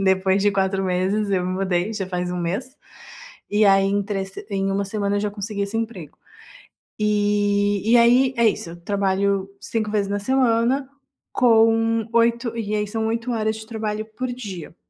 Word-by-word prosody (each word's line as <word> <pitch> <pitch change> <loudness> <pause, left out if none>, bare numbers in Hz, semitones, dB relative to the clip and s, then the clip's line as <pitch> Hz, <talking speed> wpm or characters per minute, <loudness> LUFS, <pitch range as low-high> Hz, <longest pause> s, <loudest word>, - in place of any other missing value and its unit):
depois 190 +1 +2
de 205 - +4
4 195 0 0
meses, 190 +3 0
eu 185 -2 +1
me 185 - -2
mudei 185 +2 -1
já 195 -3 -3
faz 180 -1 -3
1 180 - -3
mês, 205 +11 -3 0.7
e 210 +1 +3
aí 195 -1 +5
em 200 +1 +1
trece 195 0 -5
em 195 -1 -1
1 200 +1 0
semana 200 0 -1
eu 205 - 0
já 210 - -1
consegui 205 0 -4
esse 200 +2 -3
emprego. 215 -10 -5 0.8
E 205 -1 +1
e 240 - +7
aí 250 +3 +5
é 235 -1 +4
isso, 170 - -5
eu 170 - -10
trabalho 195 0 0
5 215 -2 -2
vezes 205 -2 0
na 205 0 -1
semana 255 +3 +1 0.4
com 225 -2 +3
oito 235 0 +1
e 215 -2 -3
aí 210 0 -1
são 220 +1 -2
8 230 +2 -2
horas 220 -1 0
de 220 0 -10
trabalho 215 -2 -3
por 255 - -2
dia. 195 -10 -8
205 Hz, 180 wpm, -22 LUFS, 195-225 Hz, 0.8 s, e